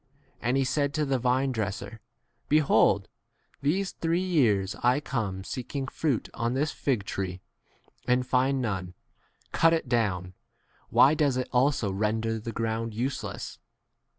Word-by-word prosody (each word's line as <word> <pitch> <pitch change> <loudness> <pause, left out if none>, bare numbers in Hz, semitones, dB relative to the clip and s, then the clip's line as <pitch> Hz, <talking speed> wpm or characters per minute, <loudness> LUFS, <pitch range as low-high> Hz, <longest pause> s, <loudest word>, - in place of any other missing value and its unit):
7 - - -4
And 130 - +2
he 135 - +3
said 140 +2 0
to 155 -1 +1
the 135 -2 0
vinedresser, 125 -4 -1 0.5
Behold, 150 -1 +4 0.5
these 185 +8 0
three 170 +2 0
years 110 - +2
I 125 +3 +3
come 105 -9 -3
seeking 135 +5 -4
fruit 140 -4 -1
on 115 +2 -1
this 145 +3 0
fig 125 -8 -1
tree 95 -2 -4 0.7
and 125 0 +2
find 130 +2 +2
none: 95 -5 -3 0.6
cut 165 0 +4
it 160 -5 0
down, 95 -7 0 0.6
why 140 - +6
does 145 -4 +2
it 130 - -2
also 125 -5 +2
render 110 +3 -1
the 115 +2 -5
ground 115 0 -2
useless 130 +4 -4
125 Hz, 140 wpm, -28 LUFS, 110-140 Hz, 0.7 s, why